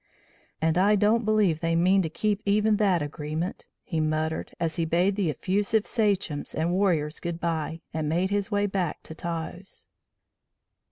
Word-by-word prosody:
"And 160 +2 +3
I 205 +3 +5
don't 215 +3 +3
believe 210 -7 +2
they 165 0 0
mean 185 +3 +4
to 165 - -2
keep 210 +4 -1
even 210 +1 +3
that 190 -7 +2
agreement," 155 +4 -4 0.2
he 165 - -2
muttered, 155 +1 -1
as 165 0 -1
he 165 - +1
bade 175 +4 +2
the 195 -5 0
effusive 200 - 0
sachems 195 -9 -1
and 160 +2 0
warriors 175 -5 +1
goodbye 165 -2 -3
and 155 -1 -1
made 180 +4 0
his 205 0 0
way 205 -1 +1
back 190 -5 -2
to - - -9
Taos. 170 +3 -6
175 Hz, 160 wpm, -26 LUFS, 160-200 Hz, 0.2 s, I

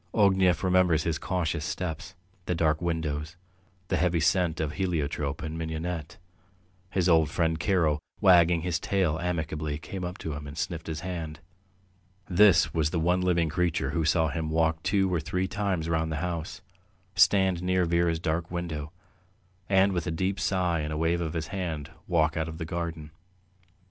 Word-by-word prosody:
Ognev 95 -4 +3
remembers 90 -4 +3
his 85 -1 -1
cautious 85 -4 -1
steps, 80 +2 -4 0.3
the 90 - 0
dark 80 -1 +1
windows, 80 -2 -2 0.5
the - - +1
heavy 90 -2 +2
scent 85 +1 +2
of 80 -2 -1
heliotrope 75 -6 -2
and 80 0 -4
mignonette. 80 0 -4 0.7
His 95 -2 +1
old 80 -3 +4
friend 80 -2 0
Karo, 80 -3 +2 0.2
wagging 85 -2 +5
his 85 -1 -1
tail 90 -6 0
amicably, 80 -3 -2
came 90 +3 -7
up 90 +2 -4
to 80 - -5
him 70 0 -6
and 70 +2 -9
sniffed 85 -3 -3
his 80 -1 -4
hand. 85 -4 -5 0.9
This 95 -2 +5
was 80 -2 +1
the 85 - -1
one 90 +3 +2
living 85 -3 +2
creature 85 +2 0
who 85 - 0
saw 80 0 +2
him 80 0 -3
walk 80 0 +1
two 95 -1 +1
or 85 - +2
three 90 +4 -2
times 95 -5 -1
round 80 -1 0
the - - -1
house, 85 +2 -5 0.5
stand 95 -1 +4
near 90 0 +1
Vera's 85 0 +2
dark 80 +1 -2
window, 80 -4 -4 0.8
and 95 0 +4
with 85 -1 -2
a - - 0
deep 95 +4 -1
sigh 90 -4 +1
and 75 0 -3
a 75 - -2
wave 85 +2 +1
of 80 -2 -3
his 80 -2 -3
hand 80 -6 -4 0.2
walk 80 -2 +2
out 80 0 -1
of 80 - -7
the 80 - -4
garden. 85 -2 -4
85 Hz, 175 wpm, -27 LUFS, 80-90 Hz, 0.9 s, wagging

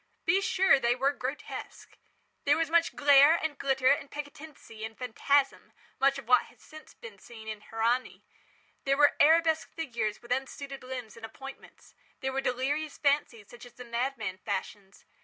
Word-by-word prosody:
Be 385 +1 +3
sure 380 -7 +4
they 240 -1 +2
were 270 +2 +2
grotesque. 275 +2 -7 0.5
There 290 +2 +4
were 330 - +1
much 330 +1 +2
glare 285 +2 +6
and 315 -3 -2
glitter 270 -2 +2
and 280 0 0
piquancy 285 -6 -9
and 220 0 -7
phantasm—much 275 +2 0
of 275 - -9
what 250 -1 +5
has - - -20
been 310 0 -13 0.3
since - - -21
seen 225 -2 -12
in 215 -1 -6
"Hernani". 230 +4 -1 0.6
There 275 0 +1
were 290 0 +5
arabesque 320 +1 +4
figures 235 -9 -3
with 240 - -14
unsuited 270 +1 -4
limbs 250 -5 -7
and 230 - -14
appointments. 270 +4 -11 0.3
There 265 -1 -2
were 270 - -1
delirious 280 +5 -2
fancies 280 -8 0
such 240 0 -13
as 245 -2 -13
the 250 +1 -11
madman 235 -5 -3
fashions. 200 0 -6
270 Hz, 160 wpm, -29 LUFS, 235-290 Hz, 0.6 s, glare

